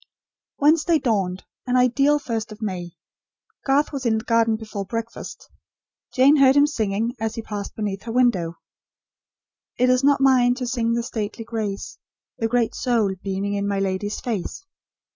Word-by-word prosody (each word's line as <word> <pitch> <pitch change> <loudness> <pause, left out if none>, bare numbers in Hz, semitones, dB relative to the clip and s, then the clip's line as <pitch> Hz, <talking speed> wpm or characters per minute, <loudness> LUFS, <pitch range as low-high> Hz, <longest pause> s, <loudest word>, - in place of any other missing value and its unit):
Wednesday 315 +3 +4
dawned; 195 -9 -1 0.2
an 250 0 +2
ideal 275 +4 +3
First 230 -6 -4
of 215 - -10
May: 180 -5 -4 0.7
Garth 285 +3 +2
was 275 -2 -4
in 225 -3 +2
the 220 - -4
garden 230 -1 +2
before 215 -2 -5
breakfast. 230 +3 -6 0.7
Jane 275 +4 +6
heard 270 -1 +6
him 285 0 +6
singing, 225 -5 -1
as 220 0 -2
he 230 - -5
passed 205 -2 -6
beneath 200 -3 -3
her 230 - -4
window. 210 -9 +1 1.2
"It 250 +1 +4
is 255 +1 +2
not 280 0 +4
mine 255 -2 +4
to 250 -1 -4
sing 235 -2 0
the 235 0 0
stately 220 -1 -5
grace, 215 -4 -4 0.4
The 225 - +1
great 235 -1 +1
soul 230 -6 +1
beaming 195 +1 -2
in 200 0 -1
my 200 -1 -1
lady's 195 +2 -2
face." 230 - -4
230 Hz, 160 wpm, -23 LUFS, 205-255 Hz, 1.2 s, Jane